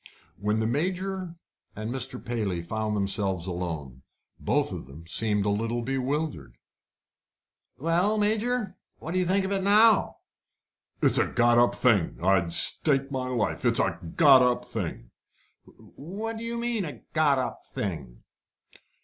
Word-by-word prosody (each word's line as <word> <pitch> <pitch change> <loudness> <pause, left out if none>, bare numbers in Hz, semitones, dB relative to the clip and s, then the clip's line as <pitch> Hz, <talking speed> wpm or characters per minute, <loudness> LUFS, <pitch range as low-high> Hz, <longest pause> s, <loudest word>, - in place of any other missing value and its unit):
When 105 +2 0
the 110 - 0
Major 180 +7 -2 0.4
and 110 +3 -4
Mr. 130 -1 -2
Paley 105 -8 -2
found 110 +3 -2
themselves 100 -3 -1
alone, 80 -8 -5 0.4
both - - 0
of - - -7
them 75 +5 -12
seemed 105 +3 +1
a - - +1
little 115 +3 -2
bewildered. 135 - -3 1.2
"Well, 175 +8 +1
Major, 215 +1 -1 0.2
what 160 - -7
do 185 - 0
you 180 - 0
think 190 +1 +2
of 190 - -3
it 195 -1 0
now?" 210 +2 +4 0.9
"It's - - +3
a - - +2
got 120 0 +3
up 120 - +3
thing! 105 -9 +2
I'll 95 -1 +2
stake 135 - +3
my 130 -2 -3
life, 120 -5 -2
it's - - +3
a - - 0 0.2
got 140 -5 +7
up 125 -1 +1
thing!" - - -6 0.5
"What 210 +9 -8
do 225 - -7
you 235 0 -3
mean 235 -3 -1
a 145 -9 -8
got 150 -3 +3
up 130 - -3
thing?" 75 -12 -6
125 Hz, 150 wpm, -26 LUFS, -, 1.2 s, got